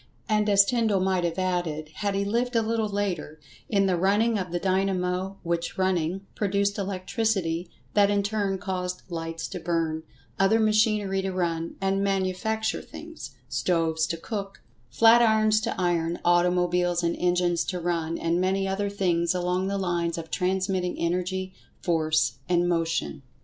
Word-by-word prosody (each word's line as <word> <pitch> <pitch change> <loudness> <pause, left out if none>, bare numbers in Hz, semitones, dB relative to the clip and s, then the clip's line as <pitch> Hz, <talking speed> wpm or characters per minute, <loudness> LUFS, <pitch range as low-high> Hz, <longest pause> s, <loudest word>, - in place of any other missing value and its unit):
And, 210 -1 +2
as 200 -1 +6
Tyndall 220 -3 +1
might 185 -1 +1
have 170 0 -1
added, 175 -5 -1
had 200 -1 -1
he 200 0 0
lived 240 +4 -1
a 225 - +3
little 220 -1 0
later—in 190 -1 -2
the 185 -2 +2
running 205 +5 +2
of 180 -3 -4
the 175 - 0
dynamo, 190 0 0
which 170 0 -2
running, 185 0 0
produced 200 0 0
electricity, 185 -3 -1 0.2
that 200 -1 +4
in 205 -1 +2
turn 200 -2 -1
caused 180 -1 -4
lights 165 0 -4
to - - -5
burn; 165 -2 -1 0.4
other 195 +4 +4
machinery 215 -3 +2
to 190 0 -2
run 170 -3 -2
and 195 0 0
manufacture 200 +3 -1
things; - - -10
stoves 165 -2 0
to 165 - -3
cook; 195 +2 -6 0.3
flat 225 - +6
irons 215 -1 +4
to 225 -3 -3
iron; 170 -1 0
automobiles 175 0 +2
and 170 0 +1
engines 175 -1 +2
to 180 - -3
run; 170 -1 -1
and 170 +2 0
many 195 +1 +1
other 200 +1 -1
things 175 -3 +1
along 180 +1 0
the 200 0 -1
lines 175 -3 -1
of 165 -1 -7
transmitting 185 0 0
Energy, 185 +2 -2 0.3
Force 155 -7 +1
and 175 0 +3
Motion. 165 -4 -1
185 Hz, 155 wpm, -26 LUFS, 170-200 Hz, 0.4 s, as